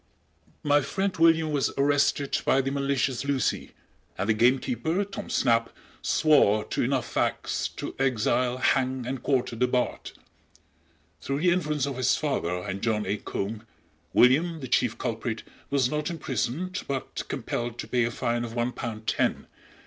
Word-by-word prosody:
My 145 0 +4
friend 190 +6 -2
William 165 -1 +4
was 145 -3 +1
arrested 140 0 +2
by 135 - +3
the 135 0 0
malicious 135 -2 0
Lucy, 140 -2 -1 0.4
and 95 - -2
the - - +5
gamekeeper, 130 - +1
Tom 195 - -7
Snap, 115 -2 +2 0.3
swore 110 -9 +4
to - - -1
enough 130 0 0
facts - - -1
to - - -5
exile, 125 -1 +1
hang 130 -1 +1
and 130 +1 -4
quarter 130 -3 0
the 125 +2 +2
Bard. 125 0 -1 1.1
Through 140 +1 -2
the 180 0 +4
influence 150 -5 0
of 140 -2 -4
his 130 0 +3
father 90 - -1
and 100 -1 -4
John 110 -2 0
A. 100 +2 -1
Combe, 105 +2 -4 0.5
William, 160 - +4
the 130 - -5
chief 120 -1 +1
culprit, 110 0 -3 0.3
was 135 -3 +2
not 150 +1 -1
imprisoned, 165 - -2
but 135 -2 -3
compelled 120 0 -3
to - - -6
pay 125 -1 +1
a - - 0
fine 120 0 -1
of 115 -1 -6
one 120 +1 0
pound 110 -3 -6
ten. 115 - 0
130 Hz, 155 wpm, -27 LUFS, 120-145 Hz, 1.1 s, the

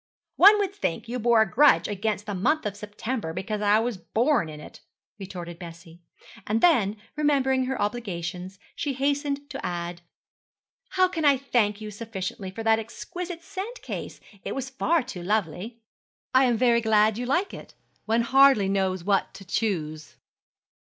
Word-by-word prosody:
'One 410 +3 +8
would 400 -2 -1
think 235 - -3
you 250 +2 -3
bore 230 -1 +5
a - - -3
grudge 280 +10 +4
against 210 0 -2
the 205 - -4
month 250 - +1
of 205 -1 -2
September 210 -2 -5
because 205 +4 -3
I 205 0 +4
was 230 -1 -1
born 230 - +1
in 150 -1 -9
it,' 150 - -12 0.4
retorted 175 -3 -7
Bessie. 170 -1 -11 0.5
And 220 +2 +1
then, 225 - +3 0.2
remembering 270 -3 +2
her 265 0 -3
obligations, 185 -4 -4 0.2
she 285 -2 -2
hastened 285 +1 -1
to - - -6
add, 175 0 -4 0.9
'How 370 -1 +4
can 330 -3 -4
I 285 -2 +5
thank 220 -6 0
you 215 0 -6
sufficiently 200 -3 -5
for 225 +4 -7
that 225 0 +4
exquisite 335 +10 -7
scent 400 +7 -7
case? - - -6 0.2
It - - -4
is 265 0 -4
far 310 +3 +1
too 240 -8 -8
lovely.' 210 +4 -2 0.5
'I 260 +1 +6
am 240 -2 +2
very 235 -1 +3
glad 220 0 +3
you 245 - -3
like 355 +9 0
it. - - -11 0.3
One 225 +2 +2
hardly 265 -4 +5
knows 190 -2 0
what 195 +1 0
to 195 - -11
choose.' 160 -7 -3
220 Hz, 165 wpm, -26 LUFS, 195-270 Hz, 0.9 s, One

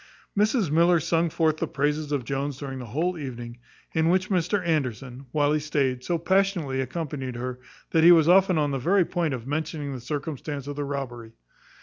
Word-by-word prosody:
Mrs 210 - +2
Miller 170 +2 +4
sung 165 +1 +1
forth 160 -1 +1
the - - -2
praises 150 +1 -1
of 140 -5 -1
Jones 140 +1 -2
during 135 -2 -6
the 125 - -7
whole 165 +9 -1
evening, 120 -4 -7 0.3
in 160 0 +2
which 185 +2 +1
Mr 180 +1 +1
Anderson, 135 -4 -2
while 145 0 +2
he 155 - +2
stayed, 135 -4 -1
so 175 +3 0
passionately 175 -6 +1
accompanied 135 -2 -4
her, 125 +1 -4 0.3
that 160 -1 +3
he 170 - +9
was 165 -2 +6
often 185 0 +5
on 145 -2 +1
the 135 - -1
very 180 +7 +3
point 165 -6 -1
of 120 -2 -8
mentioning 150 0 -3
the 130 - -6
circumstance 145 0 -4
of 145 0 -5
the 145 0 -3
robbery. 120 -5 -5
150 Hz, 195 wpm, -26 LUFS, 135-170 Hz, 0.3 s, he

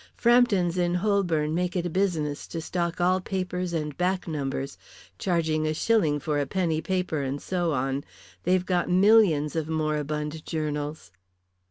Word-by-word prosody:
Frampton's 210 -8 +3
in 175 0 +1
Holborn 180 -6 +1
make 180 +1 -1
it 175 -1 0
a - - -1
business 160 -6 -1
to 165 - -5
stock 170 +1 -2
all 185 +1 +3
papers 180 -1 -3
and 150 -3 -3
back 185 +2 -1
numbers, 140 -3 -3 0.4
charging 160 -4 0
a 155 - -1
shilling 165 -7 +2
for 145 0 -1
a 140 - -1
penny 165 -1 0
paper 180 -5 -1
and 135 +1 -3
so 175 -1 -1
on. 135 +1 -1 0.4
They've 180 +1 +2
got 180 -2 0
millions 180 -6 +4
of 160 -1 -2
moribund 150 0 -2
journals." 150 - -4
165 Hz, 155 wpm, -26 LUFS, 150-185 Hz, 0.4 s, millions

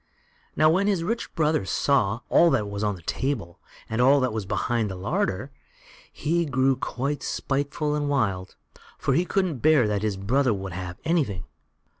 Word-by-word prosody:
Now, 155 - +4
when 195 +4 +2
his 190 -5 +1
rich 230 +6 -3
brother 155 - +2
saw 110 +1 +1
all 170 - +5
that 105 -9 +1
was 100 +1 -4
on 105 -1 0
the 85 - -14
table, 110 - -3 0.3
and 115 +2 -1
all 135 +3 +6
that 130 -4 0
was 110 -4 -4
behind 115 +2 0
in - - -2
the 95 - -5
larder, 100 +5 -2 0.6
he 170 +3 0
grew 135 -3 +2
quite 135 +3 -3
spiteful 145 +2 -2
and 145 -1 -1
wild, 100 -9 -1 0.4
for - - 0
he 175 - +2
couldn't 180 -8 0
bear 150 -4 +4
that 105 -1 -1
his 105 -2 -1
brother 115 +2 +1
should 95 -1 -6
have 90 0 -6
anything. 140 - 0
130 Hz, 180 wpm, -25 LUFS, 100-150 Hz, 0.6 s, all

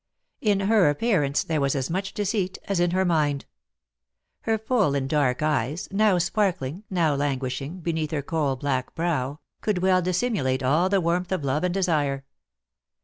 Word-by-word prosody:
In 205 -3 +2
her 200 -5 +4
appearance, 145 -4 +1
there 155 -3 -1
was 140 0 +1
as 135 +2 -2
much 195 +2 -3
deceit 200 -2 -1
as 195 -3 -1
in 175 0 +3
her 185 +2 +1
mind. 150 -5 +1 0.9
Her 225 -1 0
full 220 - +1
and 135 -1 -1
dark 140 -2 +1
eyes, 150 +1 0
now 205 -1 +3
sparkling, 175 -3 -1
now 170 -5 +2
languishing, 140 +4 -2
beneath 160 -2 -1
her 145 -2 -2
coal 145 -3 0
black 130 -1 -2
brow, 150 -4 -1 0.2
could 195 -4 -1
well 185 -1 +4
dissimulate 180 - 0
all 155 +8 +3
the 195 -1 +2
warmth 175 +2 0
of 185 -6 -1
love 140 +4 0
and 180 0 0
desire. 145 -7 0
165 Hz, 165 wpm, -25 LUFS, 140-190 Hz, 0.9 s, her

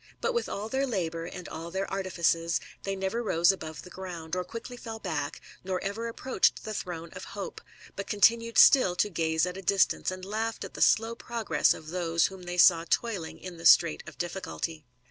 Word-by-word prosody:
But 470 - 0
with 470 - -1
all 205 +2 -4
their 265 +4 0
labour, 165 -7 -2
and 180 +1 -8
all 165 +1 -7
their 190 +2 -2
artifices, 170 -3 +1 0.2
they 195 0 -3
never 195 +5 -2
rose 175 -5 +4
above 160 -5 -7
the 180 - -12
ground, 175 -3 -6
or 180 - -1
quickly 230 +6 -8
fell 225 -2 -7
back, 155 -9 -3 0.2
nor 185 0 -2
ever 215 +4 -3
approached 255 +3 +1
the 215 - -4
throne 170 -4 -5
of - - -8
Hope, 200 - -5 0.3
but 200 - -5
con 210 - -3
tinued 230 +2 +4
atill 255 -10 +7
to 210 - +2
gaze 160 -1 +1
at 180 +1 -5
a - - -6
distance, 195 +1 +2
and 185 0 -6
laughed 220 +2 -3
at - - -10
the - - -7
slow 225 +1 +4
prcigTCis 230 -2 +1
of 155 - -10
those 170 -1 +1
whom 190 -1 -5
they 175 0 -5
saw 170 -2 +7
toiling 205 -9 -1
in 180 -2 -9
the 165 - -11
Streighl 170 -2 +6
of - - -9
I 175 - -2
H£ 190 +2 -7 0.3
RAMBLER. 155 -2 -16
185 Hz, 215 wpm, -28 LUFS, 170-220 Hz, 0.3 s, atill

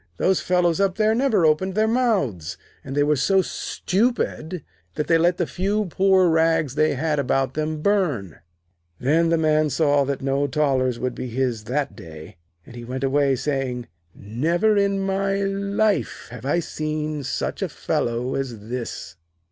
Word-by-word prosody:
Those 190 - +2
fellows 180 -1 +1
up 195 -2 +2
there 220 0 +2
never 225 -7 +2
opened 185 +5 +2
their 215 +1 +3
mouths, 200 - 0 0.3
and 135 - -6
they 145 - +4
were 150 +1 +2
so 185 +8 +3
stupid 185 - -2 0.3
that 150 - -1
they 165 -1 +3
let 175 +2 +2
the 175 - 0
few 200 +5 -1
poor 190 +1 +3
rags 160 -4 +2
they 155 0 +2
had 150 +2 0
about 135 0 0
them 155 0 -3
burn.' 150 - 0 0.6
Then 160 +6 +2
the 165 - +3
Man 155 -1 +2
saw 145 -1 +2
that 140 0 -3
no 140 +1 +1
thalers 130 -4 +1
would 125 +1 -2
be 130 - -5
his 120 -3 -2
that 135 +4 -2
day, 80 -2 -11 0.3
and 120 - -13
he 120 - -8
went 130 +3 -5
away, 135 0 +2
saying: 130 -3 -3 0.3
'Never 165 - 0
in 200 -1 +1
my 195 0 0
life 200 +1 -1
have 125 +1 -7
I 170 +4 +2
seen 155 -1 -3
such 130 - -3
a - - -1
fellow 120 +2 -2
as 135 -4 -3
this.' 120 -7 -5
155 Hz, 165 wpm, -23 LUFS, 130-190 Hz, 0.6 s, they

